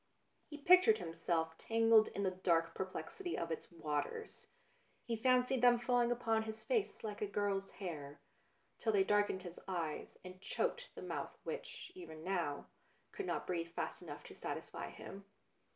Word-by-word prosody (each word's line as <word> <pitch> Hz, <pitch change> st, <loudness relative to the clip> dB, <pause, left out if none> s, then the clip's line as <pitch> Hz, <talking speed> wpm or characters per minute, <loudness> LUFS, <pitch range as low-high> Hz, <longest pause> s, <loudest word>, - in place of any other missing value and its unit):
He 300 Hz, -, -7 dB
pictured 365 Hz, +8 st, +7 dB
himself 165 Hz, 0 st, -1 dB
tangled 225 Hz, -1 st, +5 dB
in 200 Hz, -, -3 dB
the 190 Hz, -, +2 dB
dark 165 Hz, -3 st, +2 dB
perplexity 340 Hz, -, -4 dB
of 165 Hz, 0 st, -2 dB
its 160 Hz, -, -4 dB
waters, 165 Hz, -, -3 dB, 0.6 s
he 230 Hz, -, 0 dB
fancied 250 Hz, +2 st, +3 dB
them 245 Hz, -1 st, +7 dB
falling 240 Hz, 0 st, +2 dB
upon 225 Hz, -2 st, +2 dB
his 220 Hz, 0 st, -6 dB
face 455 Hz, -5 st, 0 dB
like 210 Hz, -2 st, -4 dB
a 210 Hz, -, +1 dB
girl's 200 Hz, -1 st, 0 dB
hair, 150 Hz, -7 st, -6 dB, 0.6 s
till 220 Hz, -2 st, +1 dB
they 195 Hz, -2 st, +5 dB
darkened 205 Hz, -2 st, +2 dB
his 175 Hz, -1 st, -8 dB
eyes 170 Hz, -5 st, -3 dB
and 185 Hz, 0 st, -9 dB
choked -, -, -1 dB
the -, -, -7 dB
mouth -, -, -4 dB
which, -, -, -6 dB
even 160 Hz, -, -9 dB
now, 170 Hz, -6 st, -1 dB, 0.5 s
could 400 Hz, -3 st, -4 dB
not -, -, -1 dB
breathe 170 Hz, -2 st, -2 dB
fast -, -, -3 dB
enough -, -, -8 dB
to -, -, -10 dB
satisfy -, -, -5 dB
him. 195 Hz, +1 st, -9 dB
205 Hz, 160 wpm, -37 LUFS, 170-245 Hz, 0.6 s, pictured